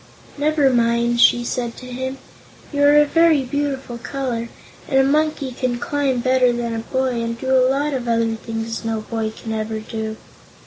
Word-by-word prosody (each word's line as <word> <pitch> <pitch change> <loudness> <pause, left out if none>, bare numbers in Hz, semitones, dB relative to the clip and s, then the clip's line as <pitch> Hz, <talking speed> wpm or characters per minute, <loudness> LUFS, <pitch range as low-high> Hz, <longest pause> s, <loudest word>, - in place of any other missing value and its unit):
"Never 295 -2 +2
mind," 235 0 +2
she 240 -1 +5
said 240 -1 -3
to 255 - -10
him. 260 +1 -5 0.6
"You 285 - 0
are 290 +1 +6
a 295 - +6
very 325 -2 +4
beautiful 270 -2 -3
color, 240 -3 -3 0.4
and 265 - +3
a - - +5
monkey 295 -1 +1
can 250 -1 -2
climb 270 0 -1
better 255 0 +3
than 235 -1 -2
a 225 - -2
boy 255 0 -1
and 230 0 -3
do 265 +1 +1
a 255 0 +4
lot 285 +2 0
of 250 -3 -3
other 230 -1 +1
things 225 0 -5
no 225 -1 -2
boy 220 0 -3
can 220 +1 -8
ever 220 0 -3
do." 220 0 -5
250 Hz, 185 wpm, -20 LUFS, 230-270 Hz, 0.6 s, are